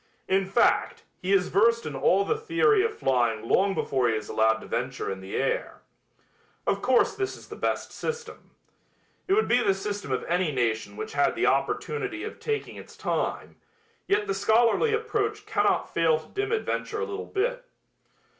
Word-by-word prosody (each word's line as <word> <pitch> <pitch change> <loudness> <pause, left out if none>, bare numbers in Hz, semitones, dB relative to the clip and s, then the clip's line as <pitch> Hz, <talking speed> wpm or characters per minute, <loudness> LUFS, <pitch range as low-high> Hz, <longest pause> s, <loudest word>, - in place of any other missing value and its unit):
In 190 0 +2
fact, 215 +5 +2 0.2
he 185 - -2
is 195 -2 +3
versed 230 +3 +3
in 150 - -5
all 190 +8 +3
the - - +1
theory 425 -1 +3
of 450 -1 -2
flying 120 -4 +1
long 195 +6 +3
before 130 -3 +1
he 110 - +1
is 110 -1 -5
allowed 110 0 +3
to 110 - -10
venture - - -3
in 95 - -5
the 95 +1 -7
air. - - -2 0.8
Of 200 - 0
course 255 -1 +3
this 390 -2 -3
is - - -15
the - - -7
best - - -2
system. 470 -1 -6 0.8
It 385 - +2
would 435 +2 +3
be 245 +1 +3
the 195 -4 +2
system 200 -5 -4
of 130 - -1
any 175 -2 0
nation 115 -4 -1
which 435 0 -5
had - - +2
the - - +1
opportunity 400 -6 -1
of 430 - -7
taking 440 -1 -3
its - - -12
time, - - -2 0.5
yet 415 +2 +2
the 410 - -1
scholarly 235 - +3
approach 435 -1 -1
cannot 425 - +1
fail 165 -2 +3
to 155 0 -12
dim 405 +2 -3
adventure 440 -1 -2
a - - 0
little 420 0 -6
bit. - - -1
235 Hz, 185 wpm, -26 LUFS, -, 0.8 s, is